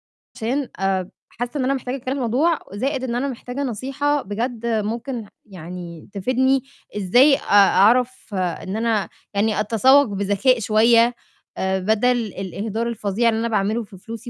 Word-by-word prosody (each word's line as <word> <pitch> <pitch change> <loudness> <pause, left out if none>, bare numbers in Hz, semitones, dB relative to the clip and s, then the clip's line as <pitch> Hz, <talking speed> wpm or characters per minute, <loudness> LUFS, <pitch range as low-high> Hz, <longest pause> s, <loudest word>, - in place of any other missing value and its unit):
عشان 255 +5 -4
آآ 190 -1 0 0.2
حاسّة 245 +4 -5
إن - - 0
أنا 270 - +2
مِحتاجة 255 -1 -3
أتكلم 260 0 -4
في - - -4
الموضوع 275 +7 +1
وزائِد 260 +5 -2
إن 240 -2 -2
أنا 255 +3 -1
محتاجة 250 +2 -5
نصيحة، 275 +4 -1
بجد 235 +3 -4
ممكن 230 +2 -2 0.2
يعني 175 -3 -9
تفيدني 260 +6 +1 0.3
إزاي 245 +9 +5
أ - - -10
أعرف 215 +4 +4
إن 185 +2 -2
أنا، 225 -3 0 0.2
يعني 210 +1 +1
أتسوق 255 +7 +4
بذكاء 205 +5 +1
شوية 230 +2 +4 0.4
آآ 190 0 0
بدل 220 +6 +2
الإهدار 210 +3 -4
الفظيع 225 0 0
اللي 220 -1 0
أنا 230 - -1
باعمله 215 +2 0
في 200 -2 -14
فلوسي 230 +5 -9
230 Hz, 150 wpm, -21 LUFS, 200-255 Hz, 0.4 s, إزاي